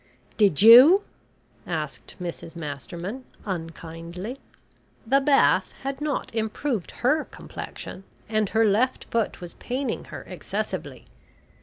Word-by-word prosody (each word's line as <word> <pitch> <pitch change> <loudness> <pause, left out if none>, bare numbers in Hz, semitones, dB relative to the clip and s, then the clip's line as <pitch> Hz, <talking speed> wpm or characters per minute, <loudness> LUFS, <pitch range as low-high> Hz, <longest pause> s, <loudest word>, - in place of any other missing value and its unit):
"Did 200 -4 +3
you?" 265 - +10 0.6
asked 155 -4 -4
Mrs 170 -1 -6
Masterman 170 - -6 0.2
unkindly. 170 +4 -6 0.7
The 270 +4 +3
bath 275 0 +3
had 275 +1 -4
not 295 -5 -2
improved 220 - -2 0.2
her 300 +4 +3
complexion, 190 - -9 0.2
and 215 -2 0
her 225 0 +3
left 230 +5 +2
foot 230 -3 0
was 175 -1 -8
paining 260 +2 -3
her - - -8
excessively. - - -5
215 Hz, 110 wpm, -25 LUFS, 170-260 Hz, 0.7 s, you